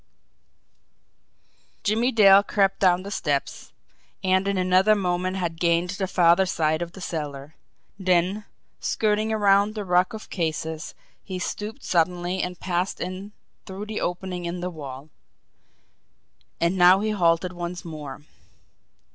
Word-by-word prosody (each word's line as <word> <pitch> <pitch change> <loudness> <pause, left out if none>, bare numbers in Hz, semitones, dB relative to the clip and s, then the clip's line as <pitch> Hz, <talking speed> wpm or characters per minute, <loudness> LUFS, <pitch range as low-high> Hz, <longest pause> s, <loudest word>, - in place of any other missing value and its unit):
Jimmie 225 +4 +1
Dale 200 -4 +7
crept 195 -1 +1
down 185 -1 +3
the 200 - -7
steps, 145 -7 -2 0.5
and 190 +1 +2
in 200 -1 0
another 185 +3 +4
moment 185 -1 -1
had 170 -3 -3
gained 170 +1 +1
the 190 0 -3
farther 180 +1 +4
side 155 -2 0
of 170 0 -5
the 195 - -11
cellar; 150 -4 -5 0.5
then, 185 +2 +1 0.3
skirting 215 0 0
around 205 0 +3
the 210 -2 -4
ruck 180 +1 +2
of 220 - -9
cases, 160 -2 -3 0.3
he 185 - -5
stooped 210 +7 -5
suddenly 175 +1 0
and 180 -1 -4
passed 180 +1 -2
in 185 +3 -5 0.4
through 195 +2 -6
the 215 0 -4
opening 180 0 -3
in 170 +1 -4
the 180 +1 -4
wall. 145 -2 -9 1.5
And 170 +3 +1
now 180 +2 +7
he 215 0 0
halted 175 -2 +1
once 175 +1 -6
more. 150 -4 -8
180 Hz, 135 wpm, -24 LUFS, 170-195 Hz, 1.5 s, Dale